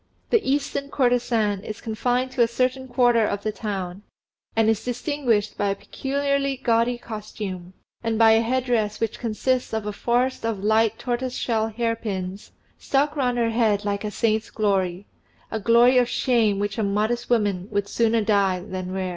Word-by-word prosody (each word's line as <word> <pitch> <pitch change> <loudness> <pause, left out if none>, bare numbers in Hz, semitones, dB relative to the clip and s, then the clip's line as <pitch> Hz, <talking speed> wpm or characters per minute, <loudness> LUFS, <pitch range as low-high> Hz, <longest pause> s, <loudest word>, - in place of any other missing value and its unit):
The 460 - +4
Eastern 280 0 -1
courtesan 240 -6 +1
is 215 - -6
confined 245 +3 -1
to 255 -1 0
a 235 - +5
certain 255 +2 -1
quarter 245 -2 +3
of 205 -1 -2
the 215 - -1
town, 195 -4 -5 0.5
and 225 -1 +3
distinguished 235 -1 0
by 205 - +1
a 195 - 0
peculiarly 275 +3 -1
gaudy 240 -1 +1
costume, 210 -5 -7 0.3
and 225 -1 0
by 225 0 +6
a 225 0 +5
head 255 +2 0
dress 215 -4 0
which 225 -2 -2
consists 245 +2 -1
of 220 -1 -2
a 210 - -3
forest 245 +4 0
of 220 -4 -2
light 220 +1 +3
tortoiseshell 240 -3 -1
hair 230 +1 -1
pins, 195 -3 -5 0.3
stuck 285 +2 +1
round 250 -4 0
her 230 -1 +1
head 215 -3 +1
like 200 0 -1
a 210 - -2
saint's 220 0 0
glory 195 -3 0 0.5
a 220 - -2
glory 235 +4 +5
of 245 -1 +1
shame 225 -5 +2
which 205 +2 -2
a - - +1
modest 215 +4 0
woman 205 -6 +1
would 205 -1 -1
sooner 230 0 +1
die 200 -3 +2
than 185 0 -6
wear. 190 -1 -2
225 Hz, 170 wpm, -24 LUFS, 205-245 Hz, 0.5 s, by